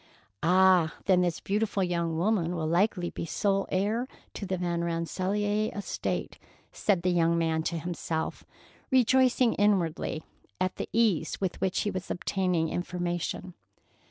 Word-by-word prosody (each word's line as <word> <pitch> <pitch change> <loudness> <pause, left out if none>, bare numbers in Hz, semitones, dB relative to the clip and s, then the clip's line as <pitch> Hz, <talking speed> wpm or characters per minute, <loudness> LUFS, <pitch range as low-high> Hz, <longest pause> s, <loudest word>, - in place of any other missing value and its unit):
"Ah! 180 -1 +4
Then 185 -2 +4
this 175 -2 0
beautiful 205 -1 0
young 170 -2 -1
woman 180 -2 +1
will 160 -2 -2
likely 175 +2 +1
be - - -5
sole 195 +4 0
heir 215 +6 0 0.3
to 200 - -5
the 190 0 -1
Van 175 -1 -1
Rensselaer 195 +5 -1
estate," 205 - -3 0.3
said 190 -5 +1
the 180 - +2
young 170 -1 +3
man 160 -1 +1
to 165 +1 -2
himself, 165 -1 -3 0.5
rejoicing 255 -1 +4
inwardly 175 -6 +1 0.4
at 185 0 -1
the - - -4
ease 220 -8 +1
with 190 -3 -3
which 190 -1 +1
he 205 - -1
was 185 -1 -5
obtaining 180 -3 0
information. 175 +1 -3
180 Hz, 140 wpm, -28 LUFS, 170-205 Hz, 0.5 s, Ah